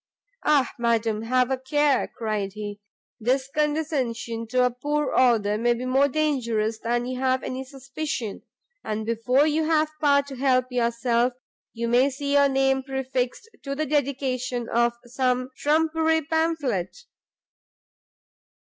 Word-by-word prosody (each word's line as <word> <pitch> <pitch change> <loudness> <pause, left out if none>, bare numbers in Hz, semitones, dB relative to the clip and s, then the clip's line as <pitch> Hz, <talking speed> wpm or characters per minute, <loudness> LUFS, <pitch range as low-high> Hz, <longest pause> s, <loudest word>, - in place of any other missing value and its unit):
"Ah, 290 -4 +3
madam, 225 -2 +1
have 250 +2 +1
a 265 - 0
care!" 285 +1 +2
cried 210 -4 -2
he; 205 -1 -7 0.4
"this 260 +4 +1
condescension 275 -7 -1
to 250 +2 +2
a 250 - +1
poor 290 +3 -2
author 215 -5 +3
may 240 +1 +2
be 245 +2 -5
more 265 +2 +3
dangerous 235 -7 0
than 240 +1 -1
you 255 0 -4
have 260 0 +1
any 260 +1 -4
suspicion! 265 -4 -5 0.4
and 215 0 -3
before 245 +5 +2
you 310 +1 +1
have 310 -1 +2
power 280 -1 +4
to 280 -1 -9
help 255 -1 +2
yourself, 235 0 +1 0.4
you 235 0 -3
may 245 +4 +4
see 280 +1 -3
your 280 0 +5
name 270 0 +2
prefixed 265 - -3
to 275 0 -4
the 310 +2 -1
Dedication 255 -4 -1
of 235 0 +2
some 255 +1 -1
trumpery 320 +1 +2
pamphlet!" 320 - -1
255 Hz, 140 wpm, -25 LUFS, 235-285 Hz, 0.4 s, your